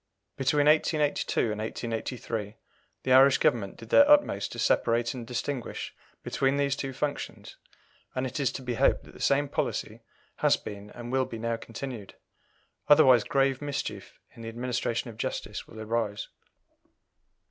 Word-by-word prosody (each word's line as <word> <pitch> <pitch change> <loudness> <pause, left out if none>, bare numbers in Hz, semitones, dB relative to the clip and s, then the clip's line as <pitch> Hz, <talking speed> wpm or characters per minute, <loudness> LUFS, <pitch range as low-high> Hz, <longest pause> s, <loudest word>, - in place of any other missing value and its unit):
Between 145 +2 +2
1882 150 -6 +2
and 105 0 -4
1883 115 -1 -4 0.5
the 130 - +2
Irish 135 +1 +7
Government 110 -8 0
did 115 -1 -12
their 285 - +6
utmost 295 0 +4
to - - -8
separate 115 +2 +2
and 120 -3 -7
distinguish 125 +1 -4 0.3
between 135 +1 0
these 140 -1 +1
two 135 -1 -4
functions, 145 +2 -4 0.6
and 130 - -1
it 130 +3 -4
is 135 -3 +1
to 135 - -6
be 125 -1 -2
hoped - - +2
that - - -15
the - - -14
same 145 +1 +2
policy - - -3 0.4
has - - +3
been 105 0 -9
and 120 0 -7
will 130 0 +2
be 115 - -7
now 115 +1 -1
continued, 115 -2 -7 0.7
otherwise 130 -6 +7
grave 135 +1 +1
mischief 145 -1 -5
in - - -13
the 115 - -5
administration 120 0 -2
of 110 - -16
justice - - -4
will 110 - -11
arise. 110 -2 -2
125 Hz, 155 wpm, -28 LUFS, 115-140 Hz, 0.7 s, Irish